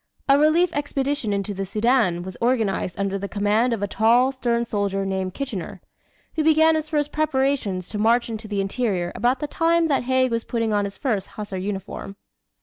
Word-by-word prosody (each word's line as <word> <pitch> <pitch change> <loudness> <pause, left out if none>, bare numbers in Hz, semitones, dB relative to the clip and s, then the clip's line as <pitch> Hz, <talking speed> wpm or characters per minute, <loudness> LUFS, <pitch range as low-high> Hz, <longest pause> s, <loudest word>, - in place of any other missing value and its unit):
A 275 0 +5
relief 325 +3 +3
expedition 285 -4 -1
into 200 0 -2
the 195 0 -3
Soudan 210 -3 +1
was 185 0 -8
organized 220 -7 0
under 195 0 -1
the 200 +1 -5
command 210 +4 +1
of 220 -3 -2
a - - 0
tall, 235 +6 +3
stern 235 -3 -1
soldier 200 -3 -1
named 190 -1 -2
Kitchener, 235 -11 -5 0.6
who 315 - +1
began 315 +1 +5
his 310 -1 -2
first 295 -2 0
preparations 265 - 0
to 210 - -4
march 230 +3 +3
into 220 -1 -6
the 205 -2 -1
interior 195 -4 -1
about 245 +5 0
the - - 0
time 330 +2 +2
that 275 -4 +1
Haig 260 0 +2
was 230 -1 -1
putting 230 -2 -1
on 205 -1 +1
his 200 0 -7
first 220 -9 -1
Hussar 205 -3 -5
uniform. 195 0 -5
230 Hz, 190 wpm, -23 LUFS, 200-275 Hz, 0.6 s, A